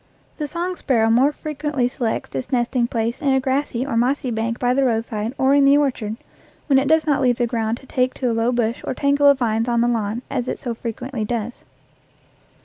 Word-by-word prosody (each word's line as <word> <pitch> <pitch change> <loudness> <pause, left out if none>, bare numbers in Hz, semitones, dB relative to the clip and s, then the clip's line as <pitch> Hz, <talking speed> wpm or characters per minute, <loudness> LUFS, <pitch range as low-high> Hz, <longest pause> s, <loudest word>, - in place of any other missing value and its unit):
The 300 - -2
song 350 +4 -3
sparrow 225 -5 +2
more 260 +5 +4
frequently 295 -4 -2
selects 245 -3 -3
its 135 -1 -4
nesting 240 -1 +1
place 230 0 -2
in 275 -2 +2
a 265 - +3
grassy 265 -1 -1
or 275 - -3
mossy 250 +2 +1
bank 230 +1 -2
by 245 0 +1
the 275 +1 +2
roadside 225 -1 -1
or 265 +1 +3
in 285 0 +5
the 275 +1 +6
orchard, 245 -7 -1 0.5
when 275 -3 +4
it 270 - -1
does 315 +1 +3
not 290 -2 +1
leave 245 -2 +2
the 240 - +1
ground 225 -1 -1
to - - -16
take 255 0 0
to 250 -3 -1
a - - 0
low 230 +2 +1
bush 235 -1 -1
or - - -3
tangle 285 +1 +3
of 280 -1 +6
vines 225 -1 0
on 235 -1 +2
the 240 - +2
lawn, 230 0 -1
as 255 -2 -3
it - - -2
so 240 - -4
frequently 235 +1 -5
does. 230 +1 -3
245 Hz, 225 wpm, -21 LUFS, 230-275 Hz, 0.5 s, the